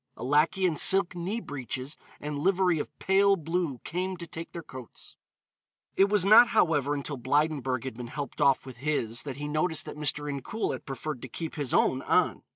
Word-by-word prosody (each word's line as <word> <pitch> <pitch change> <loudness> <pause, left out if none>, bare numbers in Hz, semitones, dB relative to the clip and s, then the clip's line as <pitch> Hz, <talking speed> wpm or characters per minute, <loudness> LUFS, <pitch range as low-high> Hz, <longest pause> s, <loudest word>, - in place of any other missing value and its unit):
A - - -7
lackey 150 +8 +2
in 165 -4 +1
silk 190 +1 +5
knee 185 +6 -3
breeches 135 - -5 0.2
and 150 -1 -4
livery 180 0 +2
of - - -4
pale 195 +1 +3
blue 165 -4 -2
came 185 +2 -3
to 170 - -7
take 165 0 -7
their 170 - -7
coats. 130 -5 -10 0.8
It 195 +1 +4
was 205 -2 +3
not, 220 +4 +8
however, 150 - +2
until 145 0 -4
Blydenburg 140 -2 0
had 130 - -5
been 120 +1 -7
helped 145 +4 -6
off 140 -2 +3
with 130 -2 -10
his 120 -5 -1
that 140 -3 -6
he 145 +1 -4
noticed 155 +2 0
that - - -8
Mr. 150 0 -2
Incoul 145 - -3
had - - -8
preferred 135 0 -5
to - - -7
keep 165 +6 -5
his 145 -4 -3
own 130 - +2
on. - - +1
150 Hz, 195 wpm, -28 LUFS, 135-180 Hz, 0.8 s, not